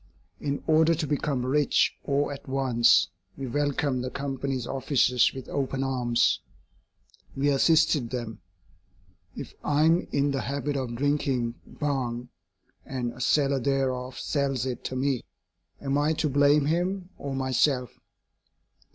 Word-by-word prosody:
In 140 -1 -3
order 160 +1 +4
to 160 0 -2
become 140 -3 -1
rich 145 +2 +2
all 145 +1 +1
at 140 - -9
once, 130 -3 +4 0.3
we 135 - -4
welcomed 140 0 0
the 130 - -3
Company's 135 -2 -3
officers 130 -2 +2
with 130 -1 -8
open 135 -1 -2
arms. 125 -3 +1 1.0
We 140 +2 +2
assisted 150 -2 +3
them. 120 -5 -5 0.9
If - - -7
I 145 +1 +2
am 165 +2 +3
in 140 0 +1
the 135 -2 -1
habit 140 +2 -2
of 130 -3 -3
drinking 135 -3 0
Bhang 125 -4 -3 0.5
and 125 -3 -4
a 125 - -10
seller 140 +1 +2
thereof 130 -1 -1
sells 135 -4 -1
it 130 -2 -4
to 130 - -3
me, 130 -1 0 0.6
am 140 0 0
I 150 +2 +2
to 155 -1 0
blame 145 +1 +4
him 180 +4 -1
or 140 -1 -4
myself? 130 -1 0
135 Hz, 135 wpm, -27 LUFS, 130-145 Hz, 1.0 s, order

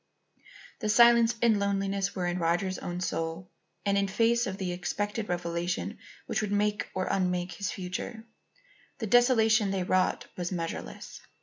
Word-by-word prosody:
The 215 - -2
silence 235 +1 +6
and 235 -1 +6
the 205 - 0
loneliness 195 0 -1
were 180 -2 -1
in 175 +1 -1
Roger's 175 +3 0
own 175 0 -5
soul; 165 0 -3 0.3
and, 200 0 +3
in 200 - +1
face 230 +4 +2
of 190 0 -4
the 185 -2 -2
expected 205 +5 -3
revelation 175 0 -2 0.3
which - - -1
would 210 -2 -3
make 210 0 0
or 185 0 0
unmake 180 -1 0
his 195 +3 -3
future, 190 +5 -5 0.7
the 225 - -3
desolation 225 -2 +4
they 195 -1 -1
wrought 185 0 +1
was 180 0 -3
measureless. 165 -2 -5
195 Hz, 160 wpm, -29 LUFS, 180-215 Hz, 0.7 s, silence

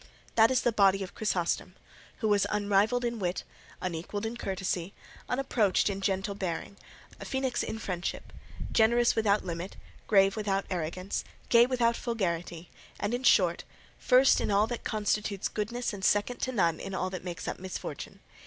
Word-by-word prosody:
That 225 0 +6
is 255 -2 +2
the 240 - +2
body 195 -2 +4
of 185 - -8
Chrysostom, 185 -3 -1 0.5
who 220 - +1
was 205 -1 +3
unrivalled 210 +4 +2
in 235 -1 -2
wit, 180 -2 -2 0.4
unequalled 185 +4 -3
in 225 +1 -3
courtesy, 190 -4 -3 0.3
unapproached 230 -6 +2
in 195 0 -5
gentle 195 +1 -1
bearing, 190 0 -4 0.4
a - - -7
phoenix 265 -1 -1
in 220 - -3
friendship, 185 -4 -4 0.4
generous 235 +2 +4
without 210 -3 +2
limit, 175 +2 -5 0.3
grave 195 -2 +5
without 200 -2 -1
arrogance, 185 +2 -3 0.3
gay 235 0 +6
without 240 -2 +2
vulgarity, 175 -8 -3 0.3
and, 205 +3 -1
in 245 - -1
short, 180 -8 +4 0.4
first 255 +2 +5
in - - -1
all 205 +1 +4
that 235 +1 -5
constitutes 210 -2 -1
goodness 235 +3 -3
and 195 -2 -7
second 205 +5 +2
to 255 - -1
none 170 -9 +1
in 195 -1 -5
all 185 0 -2
that 185 -2 -6
makes 180 -1 -6
up - - -3
misfortune. 185 0 -7
200 Hz, 160 wpm, -29 LUFS, 185-230 Hz, 0.5 s, That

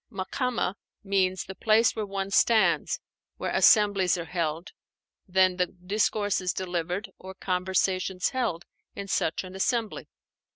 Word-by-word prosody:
"Makámah" 225 +1 -2 0.3
means 190 -2 0
the 190 - -7
place 220 +3 +3
where 215 -2 -3
one 195 0 -4
stands, 220 +2 +3 0.4
where - - -3
assemblies 200 -5 +4
are 170 - -5
held; 165 0 -3 0.6
then, 185 -1 +3
the 180 -1 +1
discourses 195 0 -1
delivered, 180 +2 -3
or 190 0 -10
conversations 185 0 0
held 230 -10 -2 0.3
in 200 - -6
such 165 -3 -1
an 185 0 -10
assembly. 225 +3 -1
190 Hz, 125 wpm, -27 LUFS, 180-205 Hz, 0.6 s, assemblies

